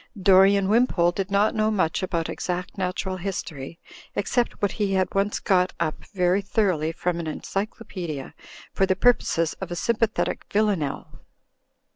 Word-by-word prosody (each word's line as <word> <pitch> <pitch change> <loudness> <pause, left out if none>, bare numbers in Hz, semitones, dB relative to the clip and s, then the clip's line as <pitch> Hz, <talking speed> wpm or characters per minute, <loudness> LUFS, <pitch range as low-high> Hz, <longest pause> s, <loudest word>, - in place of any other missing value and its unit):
Dorian 195 +1 +5
Wimpole 205 -6 +3
did 195 +2 -3
not 200 +2 +3
know 215 0 +1
much 185 -6 0
about 170 -3 -1
exact 180 0 -4
Natural 185 0 -2
History, 170 -6 -5 0.4
except 235 +4 0
what 205 - +1
he 205 -3 -1
had 185 -1 0
once 200 +1 0
got 185 -2 +2
up 155 - -2
very 180 +1 +2
thoroughly 185 -6 0
from 170 +1 -2
an 165 - -4
encyclopedia 180 - -5 0.4
for 195 - +2
the 190 - +2
purposes 180 -7 +2
of 190 - -4
a 175 - -4
s)mipathetic 225 +3 0
vilanelle. 200 -9 -1
190 Hz, 145 wpm, -24 LUFS, 175-205 Hz, 0.4 s, Dorian